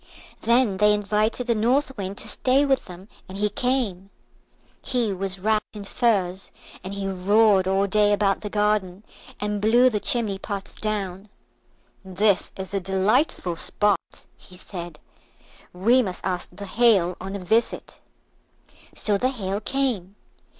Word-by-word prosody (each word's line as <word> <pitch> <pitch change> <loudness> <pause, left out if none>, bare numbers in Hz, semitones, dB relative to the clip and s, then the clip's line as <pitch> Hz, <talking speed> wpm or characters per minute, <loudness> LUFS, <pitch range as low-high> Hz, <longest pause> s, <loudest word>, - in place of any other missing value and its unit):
Then 235 -3 +2
they 210 +1 +4
invited 210 +4 0
the 235 - +2
North 260 +5 +1
Wind 195 -1 -5
to - - -7
stay 260 +6 +2
with 270 -2 +1
them, 185 +1 -11 0.2
and 190 - -7
he 210 0 0
came. 230 -8 -1 0.7
He 240 -5 -1
was 190 0 -2
wrapped 215 +3 -1
in 205 - -7
furs, 195 -4 0 0.3
and 195 +2 -6
he 200 -1 -3
roared 195 +1 +3
all 195 +1 +2
day 205 +1 +2
about 200 -2 +1
the 210 - -5
garden, 205 -2 0 0.4
and 210 0 -2
blew 240 +4 +5
the 210 - -1
chimney 210 -4 +1
pots 200 -1 -6
down. 205 -2 -4 0.7
"This 190 +1 +1
is 190 +1 -7
a 200 - +1
delightful 190 - 0
spot," 205 +2 -1
he 180 - -16
said, 175 -4 -8 0.7
"we 230 +8 +3
must 185 -6 -4
ask 180 -2 -2
the 200 +3 -9
Hail 195 -5 +3
on 195 +1 -5
a - - -4
visit." 225 +5 0 1.0
So 205 -2 -1
the 255 - +1
Hail 200 -6 -3
came. 220 -6 -2
205 Hz, 150 wpm, -24 LUFS, 190-220 Hz, 1.0 s, blew